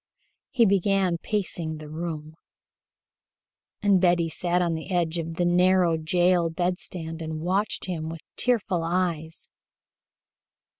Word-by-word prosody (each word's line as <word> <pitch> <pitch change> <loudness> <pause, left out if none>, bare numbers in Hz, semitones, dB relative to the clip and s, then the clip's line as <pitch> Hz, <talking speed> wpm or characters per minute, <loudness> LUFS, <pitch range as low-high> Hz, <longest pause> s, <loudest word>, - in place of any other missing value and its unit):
He 240 -4 +3
began 195 -3 +2
pacing 170 -7 -2
the 155 0 -9
room, 155 -1 -5 1.5
and 200 -3 +4
Betty 175 -2 +3
sat 175 +2 0
on 175 -2 +1
the 160 +3 -5
edge 175 -2 0
of 165 0 -4
the 175 - 0
narrow 180 -1 +4
jail 175 +2 +2
bedstead 170 -1 -3
and 160 -1 -4
watched 190 +5 0
him 160 -4 -4
with 165 -1 -7
tearful 215 -8 +1
eyes. 165 -2 -2
175 Hz, 120 wpm, -26 LUFS, 160-185 Hz, 1.5 s, and